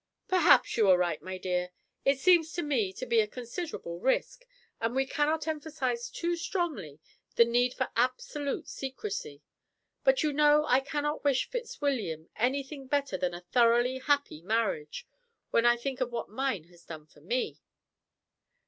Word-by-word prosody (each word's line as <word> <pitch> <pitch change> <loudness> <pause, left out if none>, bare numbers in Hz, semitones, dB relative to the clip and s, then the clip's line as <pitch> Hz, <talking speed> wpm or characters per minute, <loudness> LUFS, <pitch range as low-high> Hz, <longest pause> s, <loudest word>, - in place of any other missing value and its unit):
"Perhaps 370 -8 +4
you 215 -4 +4
are 185 - +7
right, 175 -3 0
my 185 0 -6
dear; 180 -1 -1 0.3
it 275 0 +3
seems 335 0 +4
to 345 - -2
me 245 -10 0
to 225 +7 -6
be 235 -2 +3
a 215 - +3
considerable 240 - -6
risk, 265 - 0 0.3
and 230 +2 -1
we 270 0 +2
cannot 305 +4 0
emphasize 290 -6 -2
too 345 0 -2
strongly 320 - -3 0.4
the 235 - +7
need 245 +2 +1
for 260 - -2
absolute 255 +4 -1
secrecy; 265 - -6 0.6
but - - +4
you 300 -1 +1
know 300 +1 +5
I 255 -2 +4
cannot 295 +2 -3
wish 275 -3 +2
Fitzwilliam 270 - -3
anything 270 +3 -2
better 280 -6 0
than 180 -1 -1
a 175 - -8
thoroughly 240 +2 +3
happy 285 - 0
marriage, 190 -7 -1 0.5
when 230 +1 +4
I 240 0 +5
think 260 +2 -4
of 245 -1 0
what 235 - -4
mine 225 - -2
has 175 +1 -21
done 155 -2 -9
for 150 -1 -22
me." 240 - -2
255 Hz, 160 wpm, -29 LUFS, 205-295 Hz, 0.6 s, are